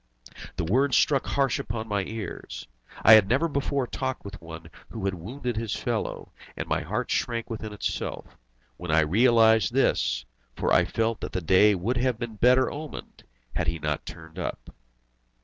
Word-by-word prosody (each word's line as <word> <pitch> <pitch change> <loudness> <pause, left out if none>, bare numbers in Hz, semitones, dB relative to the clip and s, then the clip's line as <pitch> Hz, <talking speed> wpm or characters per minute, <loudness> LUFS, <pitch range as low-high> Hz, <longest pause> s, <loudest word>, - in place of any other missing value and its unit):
The 90 - -2
words 130 - +3
struck 140 -3 +2
harsh 135 -3 +1
upon 110 0 -4
my 105 -2 0
ears. 110 - -7 0.4
I 110 - +9
had 105 -3 +7
never 135 +8 +2
before 140 -2 -1
talked 130 -1 -4
with 100 -3 -8
one 80 0 -10 0.2
who 110 -4 -6
had 95 - 0
wounded 120 +7 -5
his 115 -2 -2
fellow, - - -3 0.3
and - - -4
my - - 0
heart 105 - -3
shrank 115 -2 -1
within 110 -1 -5
itself, 105 - -4 0.4
when 90 - -8
I 80 +1 +4
realised 110 +3 +4
this, 60 0 +1 0.3
for - - 0
I - - +5
felt 115 0 -1
that - - -5
the 90 - 0
day 95 +4 +5
would 110 +8 -1
have 125 -1 +1
been 120 -1 -5
better 125 +3 +4
omened 150 +1 -8 0.3
had 85 0 -1
he 80 0 0
not 75 -1 -3
turned 80 0 -10
up. - - -5
110 Hz, 175 wpm, -26 LUFS, 90-125 Hz, 0.4 s, I